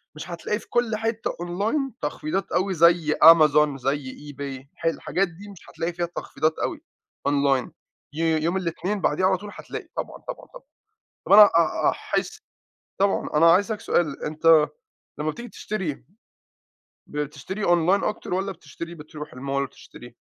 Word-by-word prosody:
مش 155 - -8
هتلاقي 175 +5 -3
في - - -16
كل 240 -2 +1
حتَّة 225 +1 -2
online 205 - -2
تخفيضات 155 +5 -3
أوي 185 +2 +1
زي 170 -2 +4
Amazon، 150 -3 +6
زي 135 +2 -4
eBay، 135 -2 -7
ح - - -10
الح 165 - +2
الحاجات 195 +2 -1
دي 180 +5 -12
مش 195 -4 -14
هتلاقي 170 +1 -3
فيها 175 0 -1
تخفيضات 160 -2 -2
أوي - - -2 0.5
online. 140 -3 +2 0.4
يو 160 +1 +1
يوم 165 +4 0
الاتنين 190 +3 -2
بعديه 165 +4 +1
على 190 0 +3
طول، 205 +3 -9
هتلاقِي - - -8
طبعًا، - - -4
طبعًا، - - -7
طبعًا. - - -12 0.6
طَب - - +1
أنا 210 +1 +11
أ 170 -5 +2
أ - - +6
احس - - -3 0.6
طبعًا، 200 0 +1
أنا 165 +2 +6
عايِز 190 +4 +4
أسأَلَك 220 -2 -4
سؤال، 155 -5 0
أنتَ 155 0 +4 0.5
لمَّا 155 +1 -1
بتيجي 235 +10 -8
تشتري 190 -14 -4 1.0
بتشتري 150 +7 -4
online 175 +3 +3
أكتر 210 -3 -3
والّا 190 +2 -1
بتشتري، 170 0 -9
بترُوح 150 -2 -10
الmall 135 +2 -7
وتشتري؟ 125 -3 -10
165 Hz, 160 wpm, -24 LUFS, 150-195 Hz, 1.0 s, أنا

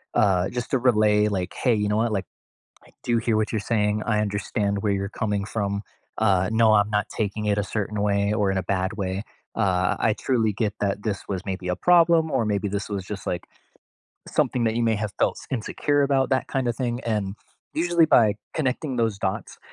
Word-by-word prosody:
uh, 95 -2 +3
just 120 +2 -4
to 135 - +3
relay, 105 -4 +3
like, 90 -3 -2
"Hey, 125 -3 +2
you 105 -1 0
know 105 - +1
what, 115 +1 +1
like, 95 -2 -1 0.6
I - - -19
do 120 -1 +2
hear 115 -1 +1
what 110 -1 0
you're 110 - 0
saying. 105 -1 +1
I 105 -2 +2
understand 100 -1 -1
where 105 -2 +1
you're 100 0 -1
coming 105 -2 0
from, 100 -2 -2 0.4
uh, 95 -3 +3
no, 110 -1 +5
I'm 105 0 +3
not 105 -1 0
taking 105 0 -2
it 105 0 +1
a 105 - 0
certain 105 +1 -3
way 100 0 +1
or 105 -2 +1
in 95 - 0
a 95 - -1
bad 95 +2 -1
way, 95 -1 -3 0.3
uh, 90 -4 +1
I 110 - +2
truly 115 -3 0
get 105 0 -1
that 100 0 -1
this 105 -3 -3
was 95 -2 -3
maybe 95 -1 -4
a 90 - 0
problem 170 - +4
or 115 - +1
maybe 105 -1 -1
this 100 +1 -3
was 100 -3 -3
just, 100 -1 -7
like, 90 - -3 0.8
something 125 - +1
that 110 -1 +1
you 120 - +1
may 110 - +2
have 105 -1 -3
felt - - +1
s - - -13
insecure 145 +4 0
about, 135 -2 +2
that 130 -1 +1
kinda 130 -3 0
thing," 120 0 -2
and 105 -4 -1 0.5
usually 170 -2 +4
by 110 -8 +5 0.2
connecting 135 -1 -1
those 115 -4 0
dots, 95 -1 -3
105 Hz, 215 wpm, -24 LUFS, 100-115 Hz, 0.8 s, no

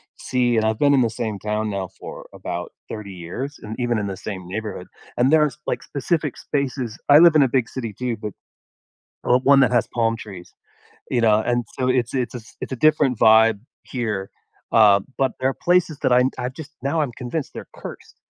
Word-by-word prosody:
see, 125 -2 0
and 110 - +2
I've 110 0 +1
been 145 -1 +4
in 135 - +4
the 115 - +2
same 110 -2 -4
town 105 +1 -2
now 100 -2 -3
for - - -9
about - - -5 0.2
30 105 -2 -7
years 105 - -6
and 110 +1 -6
even 120 -2 0
in 100 - -2
the 95 - -4
same 95 -3 -7
neighborhood. 100 -1 -5 0.3
And 130 +4 +3
there's, 150 -4 +3
like, - - -2
specific 150 +1 -2
spaces 130 -5 -3
I 145 +1 +9
live 170 -1 +7
in 150 - +7
a 135 - +2
big 125 -2 +1
city 115 -5 -5
too, 125 +2 -3
but, 105 -1 -6 0.9
well, 125 +1 +4
one 135 +1 +5
that 130 - +4
has 120 -2 +2
palm 115 -1 +1
trees, 95 -6 -10 0.6
you 120 - +1
know? 110 -2 +4
And 120 0 0
so 130 - +1
it's 125 -2 +1
it's 130 -3 -1
a 120 - -6 0.2
it's - - -5
a - - -2
different 145 -2 +3
vibe 110 -1 +6 0.2
here, 105 -6 -3 0.4
uh, 105 -3 +6 0.2
but 135 -2 +1
there 130 +1 +2
are - - -2
places 175 -2 +1
that - - +1
I'm 125 +1 +4
I've 125 +1 -3
just 155 +1 -10
now 145 +4 +1
I'm 140 -5 -1
convinced 130 +4 -4
they're - - -8
cursed. - - -10
120 Hz, 210 wpm, -22 LUFS, 110-135 Hz, 0.9 s, I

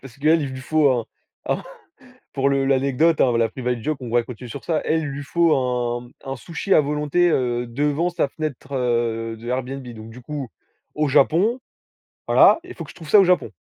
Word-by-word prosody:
Parce 135 -4 -13
qu'elle, 155 +2 +3
il 140 - -3
lui 130 0 -7
faut, 150 +1 +2
un 120 -3 0 0.5
un, - - 0 0.7
pour 140 0 +1
le 135 0 +1
l'anecdote, 140 +4 +2
hein 120 -3 +3
la, 115 -1 +3
private 125 -2 -3
joke, 155 +5 -2
on 125 - -6
va 120 +1 +2
continuer 125 0 -9
sur - - -8
ça. 160 -3 0
Elle, 160 - +2
il 155 - -3
lui 140 +1 -5
faut 170 +2 +2
un 125 -2 -2 0.2
un 135 0 -4
sushi 170 - -2
à - - +6
volonté, 150 +4 +1
heu, 120 -3 0
devant 145 +7 0
sa 175 -4 0
fenêtre 140 -3 -6
de 115 -2 -1
Airbnb, 130 +1 -3
donc 110 -1 -10
du 125 +3 -12
coup, 140 -1 -6 0.5
au 150 0 +1
Japon, 165 - +3 0.7
voilà, - - +6
il 365 - -10
faut 165 - -7
que 150 - -12
je - - -14
trouve 160 -3 -11
ça 210 - +7
au 195 - +5
Japon. 180 0 +2
135 Hz, 210 wpm, -22 LUFS, 125-155 Hz, 0.7 s, ça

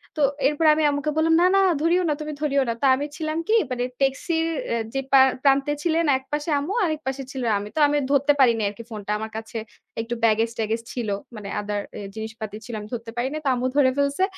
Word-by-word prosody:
তো 305 - -2 0.3
এরপরে 305 +2 +3
আমি 310 - +1
আম্মুকে 290 +1 -1
বললাম, 325 +1 +3
"না, - - +5
না, - - +5 0.2
ধরিও 345 +3 +3
না, - - +3
তুমি 305 0 -4
ধরিও 280 -2 +2
না।" - - +1
তা 275 - +4
আমি 285 +2 -3
ছিলাম 315 0 -2
কি 440 - +2 0.2
মানে 245 0 -1 0.2
ট্যাক্সির 320 +5 +1 0.2
অ্যা 235 - 0
যে 270 - 0
পা 270 - +7 0.2
প্রান্তে 275 +1 +3
ছিলেন 335 -1 +2
একপাশে 295 +4 -4
আম্মু 325 +8 -3
আরেকপাশে 280 -4 -3
ছিলাম 245 -4 -1
আমি। 205 +1 -7
তো - - 0
আমি 295 0 +1
ধরতে 280 +1 +4
পারিনি 235 -4 +4
আরকি 210 +3 -10
phone 215 -2 -7
টা, - - -1
আমার 220 0 -5
কাছে 225 +1 -6 0.4
একটু 235 +1 -4
baggage 225 +1 +3
ট্যাগেজ 225 +1 -1
ছিল। 235 -4 -3 0.3
মানে 205 -2 -7
other 205 0 -2 0.2
এ - - -6
জিনিসপাতি 220 -1 -6
ছিল, 240 - -8
আমি 210 - -8
ধরতে 230 -1 -5
পারিনি। 260 +5 -1
তো - - 0
আম্মু 250 +1 -2
ধরে 265 -3 +5
ফেলছে। 280 +6 +1
270 Hz, 220 wpm, -24 LUFS, 225-300 Hz, 0.4 s, পা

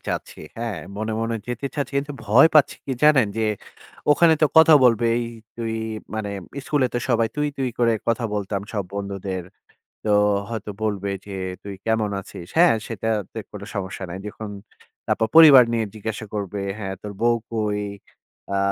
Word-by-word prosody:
চাচ্ছি। - - -4 0.2
হ্যাঁ, 115 -5 -3 0.2
মনে, 110 +1 -2
মনে 115 0 -1
যেতে 120 +3 -3
চাচ্ছি। 145 -1 -3
কিন্তু 145 +1 -4
ভয় 120 +9 +7
পাচ্ছি 150 - +5
কি 135 - -1
জানেন? 145 -7 +6
যে, 110 - 0 0.7
ওখানে 160 +2 +6
তো - - +7
কথা 160 -1 +9
বলবে, 115 -1 +4
এই 120 - 0 0.3
তুই 115 -1 -3 0.4
মানে, 105 -2 -3 0.3
স্কুলে 145 -4 +2
তো 120 - +2
সবাই 115 -2 +2
তুই, 150 0 +1
তুই 130 -1 0
করে 115 -1 +3 0.2
কথা 115 0 +1
বলতাম 100 -1 -2
সব 100 -4 -2
বন্ধুদের। 100 -2 -4 0.6
তো - - -2 0.4
হয়তো 110 -2 -5
বলবে 100 -2 -1 0.2
যে, 100 - -8 0.3
"তুই 100 -1 -7
কেমন 110 -2 +1
আছিস?" 90 -2 -10
হ্যাঁ, 175 -7 +6
সেটাতে 110 -1 -3
কোন 105 -1 -9
সমস্যা 95 -1 -4
নাই। 90 - -5
দেখুন, 105 0 -7 0.6
তারপর 110 - +1
পরিবার 145 -6 +10
নিয়ে 115 -1 +1
জিজ্ঞাসা 110 +1 -5
করবে, 100 -1 -3 0.2
"হ্যাঁ, 95 -2 -4
তোর 105 -1 -6
বউ 120 0 +4 0.2
কই? 105 -2 -1 0.8
আ - - +2
110 Hz, 165 wpm, -23 LUFS, 100-120 Hz, 0.8 s, পরিবার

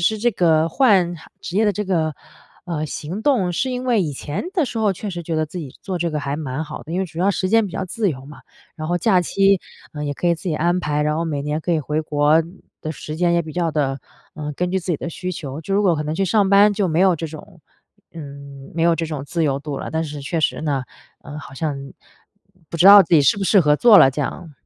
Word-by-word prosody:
施 215 +5 +1
这 240 +1 +1
个 165 -3 +3
换 190 - +3 0.3
职 180 - -6
业 220 - +3
的 205 - +2
这 210 +2 -3
个， 160 -5 0 0.5
呃， 160 -4 -3
行 170 +9 -6
动， 220 -11 +2
是 255 +9 -1
因 250 0 -4
为 235 -6 +2
以 150 -3 -3
前 145 +3 -5
的 345 -7 +1
时 235 -2 -5
候 210 -3 +2
确 205 +3 -6
实 175 -2 -5
觉 165 -1 -3
得 155 0 0
自 175 +3 -7
己 140 -5 -7
做 190 -2 -4
这 170 -1 -1
个 150 - -2
还 140 -1 -3
蛮 150 0 -4
好 155 - -8
的， 160 - -12
因 180 - -1
为 190 - -1
主 165 +1 -7
要 195 +2 +3
时 185 -1 -1
间 225 +1 +4
比 - - -12
较 190 - -3
自 205 +1 -1
由 130 -2 -7
嘛， 150 +1 -12 0.4
然 155 -1 -6
后 175 0 +1
假 185 -1 +3
期， 195 +2 +2 0.3
呃， 150 -1 -5
也 145 - -2
可 175 - -3
以 170 - +4
自 165 - -13
己 155 - -1
安 175 +3 +1
排， 150 -2 -1
然 150 +1 0
后 165 - -1
每 145 -3 -2
年 150 +2 -2
可 175 - -3
以 160 - +2
回 150 +2 -2
国 150 +1 +3 0.4
的 155 - -3
时 155 0 -7
间 170 +1 +1
也 170 - +3
比 155 -1 -9
较 170 -2 0
地， 140 -3 -1 0.3
呃， 150 -1 -5
根 180 0 -1
据 190 - +1
自 175 - -13
己 170 -4 0
的 170 - -5
需 180 +2 -5
求。 150 -3 -6
就 195 - -5
如 205 +1 +3
果 175 - +4
可 150 - -2
能 150 +1 -3
去 195 - +1
上 200 +1 +2
班 200 +1 +6
就 200 -3 0
没 160 +1 0
有 185 -1 +5
这 165 0 -5
种 155 +2 -12 0.5
嗯， 140 -3 -10
没 165 - -1
有 170 -1 +3
这 165 - -2
种 150 -3 -5
自 165 +2 -1
由 140 -2 0
度 145 -2 -5
了， - - -5
但 160 0 0
是 150 -2 -6
确 155 +4 -2
实 - - 0
呢， 140 -4 -1 0.4
呃， 150 0 -8
好 140 -2 -11
像 145 0 -2 0.9
不 170 - -5
知 180 - +4
道 205 0 +11
自 170 - +1
己 150 - +6
适 140 +9 +3
不 195 - -2
适 195 0 +5
合 150 -2 +3
做 230 +1 +7
了 135 - +7
这 145 - -4
样。 155 +3 -5
165 Hz, 295 characters per minute, -21 LUFS, 150-190 Hz, 0.9 s, 道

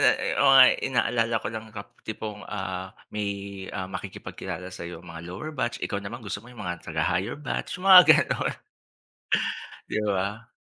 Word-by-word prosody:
ne - - +7 0.3
o 140 - +6
ngay 130 -1 +9 0.2
inaalala 115 -3 +1
ko - - 0
lang 110 0 -6
kap 100 -2 -9 0.2
tipong, 105 -1 -5
ah, 95 -1 -5 0.2
may, 105 -1 -1 0.4
ah, 95 -2 -3
makikipagkilala 95 -1 -6
sa'yo, 90 0 -8
mga 85 -1 -9
lower 130 - -6
batch 125 -5 -2
ikaw 100 - -2
naman 110 +4 -7
gusto 100 0 -4
mo 120 - -15
yung 115 -4 -9
mga 90 0 -4
taga-higher 100 +6 0
batch, 150 +4 -4
yung 180 - -10
mga 180 - +13 0.3
ganon. - - -1 1.3
'Di 105 - -1
ba? 100 +5 -2
105 Hz, 165 wpm, -26 LUFS, 95-115 Hz, 1.3 s, mga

